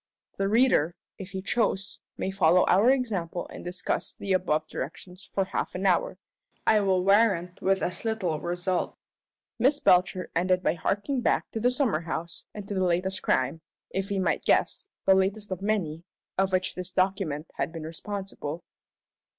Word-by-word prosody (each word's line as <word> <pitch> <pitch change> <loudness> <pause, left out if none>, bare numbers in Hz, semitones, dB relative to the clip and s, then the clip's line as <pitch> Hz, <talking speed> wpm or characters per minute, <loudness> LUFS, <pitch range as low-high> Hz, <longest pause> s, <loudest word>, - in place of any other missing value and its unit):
The 195 - +1
reader, 210 - +3 0.2
if 190 -1 -7
he 190 -1 -5
choose, 195 -3 0 0.2
may 190 - -2
follow 180 -2 +4
our 205 +6 +5
example 200 -10 0
and - - -9
discuss 180 +1 -2
the 195 -1 -2
above 155 -4 +1
directions 180 +8 -7
for 195 -1 -1
half 185 - -3
an 185 +2 -2
hour 185 -1 +2 0.5
I 220 - +5
will 190 -2 +2
warrant 195 -4 +3
with 195 0 +2
as 180 - -3
little 205 -9 -1
result. 175 +1 -2 0.6
Miss 275 +5 +3
Belcher 185 -2 +3
ended 180 +2 +2
by 155 - +3
harking 205 - -1
back - - +1
to 225 - -3
the 245 +3 +3
summer 250 - +1
house 165 0 -5
and 205 -2 -8
to 205 - -4
the 190 -1 +1
latest 185 +2 0
crime 130 +5 +1 0.3
if 195 +2 -2
we 200 - -1
might 190 - 0
guess, 395 - +2 0.2
the 190 - +7
latest 195 +2 +1
of 185 0 -3
many 180 -6 -1 0.3
for 195 0 +3
which 185 0 0
this 180 0 -6
document 185 -6 0
had - - -1
been 165 -1 -7
responsible. 170 -1 -5
190 Hz, 170 wpm, -27 LUFS, 175-200 Hz, 0.6 s, the